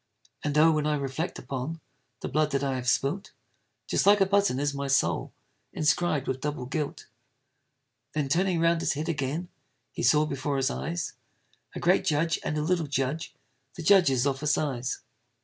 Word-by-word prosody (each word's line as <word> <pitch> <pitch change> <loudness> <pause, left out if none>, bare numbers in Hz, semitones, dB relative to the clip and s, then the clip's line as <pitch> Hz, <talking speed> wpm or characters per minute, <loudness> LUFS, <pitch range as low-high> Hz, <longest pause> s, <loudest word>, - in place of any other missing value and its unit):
And, 150 0 0
oh! 160 +2 +7
when 150 -1 0
I 150 - +2
reflect 140 +4 -3
upon 140 +5 -5 0.4
The - - -3
blood 155 0 +1
that 140 0 +1
I 135 -1 0
have 125 -1 -1
spilt, 140 - 0 0.5
Just - - 0
like 205 0 +7
a 195 - +5
button 200 -8 +2
is 145 0 0
my 140 0 -3
soul, 135 0 +1 0.4
Inscrib'd 150 -2 +1
with 130 0 -2
double 145 -3 -3
guilt! 145 +2 -4 1.1
Then 150 -2 0
turning 175 +4 +1
round 165 0 +3
his - - +1
head 150 +3 -4
again, 155 +3 -2 0.4
He - - -5
saw 150 +5 +4
before 140 -1 -2
his 135 +1 +1
eyes 170 +1 -3 0.6
A - - -3
great 180 +2 +3
judge, 165 +2 +1
and 155 - -2
a 150 - 0
little 170 -1 0
judge, 140 +4 -2 0.4
The - - -6
judges 155 -9 +5
of 135 -1 0
a 150 - -2
size! 135 -4 -1
150 Hz, 180 wpm, -27 LUFS, 135-165 Hz, 1.1 s, oh